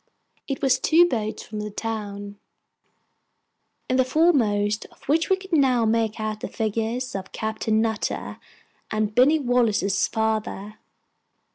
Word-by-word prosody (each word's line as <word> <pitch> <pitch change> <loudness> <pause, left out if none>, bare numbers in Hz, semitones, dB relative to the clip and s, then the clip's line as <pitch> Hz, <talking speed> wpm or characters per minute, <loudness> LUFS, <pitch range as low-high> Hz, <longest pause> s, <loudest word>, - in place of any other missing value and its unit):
It 275 0 -4
was 260 -1 +3
two 330 +5 +5
boats 220 -9 -3
from 215 0 -7
the 210 0 -4
town, 205 -2 -5 1.5
in 255 - +1
the 260 - +5
foremost 225 -9 +2
of - - -24
which 320 +4 +1
we 380 - +5
could 380 -1 -11
now 260 -6 +3
make 220 -1 0
out 215 -1 -3
the - - -5
figures 225 +3 -2
of 190 -1 -6
Captain 220 0 -1
Nutter 220 -2 -2 0.5
and 215 -1 -1
Binny 265 +7 +5
Wallace's 230 - +1
father. 220 -2 -2
220 Hz, 135 wpm, -24 LUFS, 215-255 Hz, 1.5 s, two